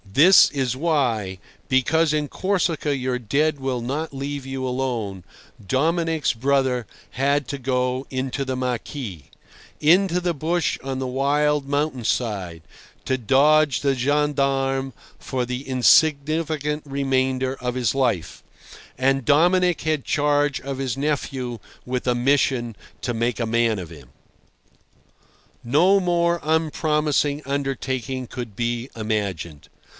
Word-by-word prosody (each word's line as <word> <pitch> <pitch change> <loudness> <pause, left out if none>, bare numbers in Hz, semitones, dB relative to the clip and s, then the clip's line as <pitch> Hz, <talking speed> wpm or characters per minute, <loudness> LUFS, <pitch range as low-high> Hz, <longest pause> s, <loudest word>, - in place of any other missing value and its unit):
This 175 - +7
is 130 -3 -1
why—because 130 - 0
in 150 -1 0
Corsica 165 -6 -1
your 130 -1 -1
dead 140 +6 0
will 130 -2 -1
not 140 +6 -3
leave 140 0 -5
you 135 -1 -4
alone—Dominic's 130 - -2
brother 130 0 +1 0.3
had 140 +1 0
to 140 - -3
go 125 0 -1
into 130 +1 -2
the 130 -1 -3
maquis, 125 - -4 0.6
into 180 +3 +4
the 175 -1 -1
bush 165 +2 -1
on 135 -1 -3
the 130 - -2
wild 145 +2 +1
mountain 145 -3 -1
side, 95 -9 -2 0.4
to 130 - 0
dodge 140 +3 +3
the 140 -1 +1
gendarmes 135 -1 0 0.3
for 130 -2 -3
the 125 +3 -5
insignificant 150 +3 +2
remainder 130 -2 0
of 125 0 -2
his 125 -2 0
life, 120 -11 -1 0.5
and 135 +1 +1
Dominic 175 +6 +3
had 155 -3 -1
charge 145 -1 +1
of 135 0 -6
his 130 -2 -2
nephew 135 -4 -2 0.3
with 125 0 -3
a 125 -1 +2
mission 125 -2 +1 0.3
to 120 - -2
make 115 0 -1
a 115 - 0
man 115 -2 +1
of 85 -2 -8
him. 70 -6 -13 1.5
No 175 +11 +4
more 170 -1 +1
unpromising 150 -2 +1
undertaking 130 -2 -3
could 120 -5 -7
be 120 +2 -2
imagined. 100 -9 -4
135 Hz, 120 wpm, -23 LUFS, 125-150 Hz, 1.5 s, This